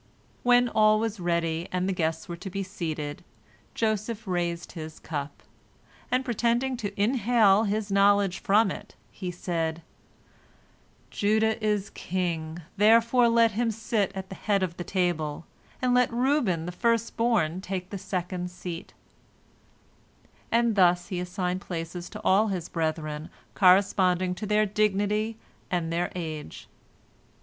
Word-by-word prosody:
When 245 0 +5
all 215 -2 +4
was 225 -2 -2
ready, 170 -1 -1
and 180 0 0
the 195 - 0
guests 160 -2 -2
were 175 - -5
to 185 +3 -7
be 195 +1 -3
seated, 160 -6 -5 0.5
Joseph 220 0 -1
raised 175 -2 -2
his 160 -1 -8
cup, 145 -2 -6 0.7
and, 255 +1 +1
pretending 240 +2 +1
to 205 -3 -5
inhale 220 -2 +4
his 210 0 -2
knowledge 200 -1 +3
from 215 -2 +3
it, - - -9 0.2
he 185 -2 -5
said, 165 -2 -3 1.3
"Judah 220 +1 +1
is 210 -2 0
king, 170 -2 -3
therefore 230 +3 +5
let 230 -1 +4
him 230 +3 0
sit 220 -2 -1
at 190 0 -6
the - - -6
head 200 -1 0
of 175 -2 -3
the 175 - -4
table, 170 -5 -1 0.4
and 250 -1 +3
let 250 0 +3
Reuben 235 - +1
the 180 - -4
first 230 +3 0
born 205 -8 +1
take 185 -1 -5
the 200 - -4
second 180 -1 -3
seat," 175 -1 -8 1.6
and 235 -1 +3
thus 175 -2 +3
he 185 -3 -2
assigned 180 0 -2
places 175 -1 -5
to - - -8
all 205 +4 +4
his 185 -5 -3
brethren 155 -2 -3 0.2
corresponding 185 -1 +4
to 210 +4 -6
their 210 +1 +3
dignity 210 +1 0 0.3
and 170 -3 -1
their 175 +1 -1
age. 155 - -6
195 Hz, 140 wpm, -27 LUFS, 175-220 Hz, 1.6 s, When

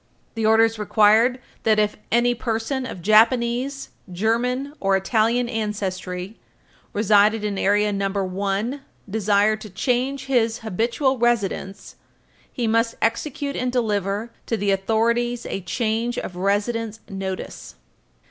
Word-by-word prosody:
The 225 -1 0
orders 225 0 +4
required 215 +4 +4 0.2
that, 220 -1 +3
if 210 -1 +1 0.2
any 240 +1 +3
person 240 +3 -2
of 180 - -8
Japanese, 235 +5 +3 0.2
German 245 +8 0
or 195 -1 +2
Italian 230 +4 +1
ancestry 195 -3 -4 0.5
residing 210 +1 +3
in 205 -2 -2
Area 205 +1 +2
No. 195 0 -1
1 200 +6 -2 0.3
desired 210 +1 +2
to 215 - -8
change 255 +6 -1
his 240 -3 +1
habitual 235 +6 0
residence, 200 -4 -1 0.5
he 240 - -2
must 230 +1 +1
execute 280 +5 -1
and 250 0 -1
deliver 210 -2 -1 0.2
to 230 - 0
the 205 -1 0
authorities 235 +4 0
a 195 - -4
Change 225 +5 -1
of 180 - -5
Residence 210 +4 -1
Notice. 195 -2 -6
220 Hz, 120 wpm, -22 LUFS, 200-240 Hz, 0.5 s, orders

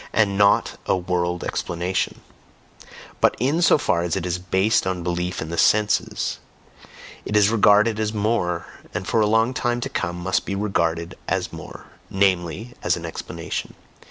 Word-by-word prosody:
and 105 -3 +2
NOT 100 0 +3
a - - +3
world 90 -1 -1
explanation; 90 +2 -2 1.0
but - - +3
in 140 +8 +1
so 170 - +5
far 110 - +1
as 85 -1 -1
it 95 -2 -2
is 90 0 -1
based 95 +4 +1
on 90 -2 -2
belief 90 0 -2
in 80 - -8
the 85 - -2
senses, 105 0 +2 0.8
it 105 - 0
is 105 -1 +5
regarded 105 0 +4
as 110 -1 0
more, 105 -6 0 0.3
and - - -3
for 115 - +2
a 105 - +3
long 115 +3 +2
time 120 -1 -1
to - - -4
come 85 - -2
must 90 +2 -1
be 100 - -3
regarded 85 -4 -1
as - - -1
more - - -9 0.2
namely, 95 +3 0
as 85 - +1
an 85 - -7
explanation. 80 - -5
95 Hz, 165 wpm, -23 LUFS, 85-110 Hz, 1.0 s, so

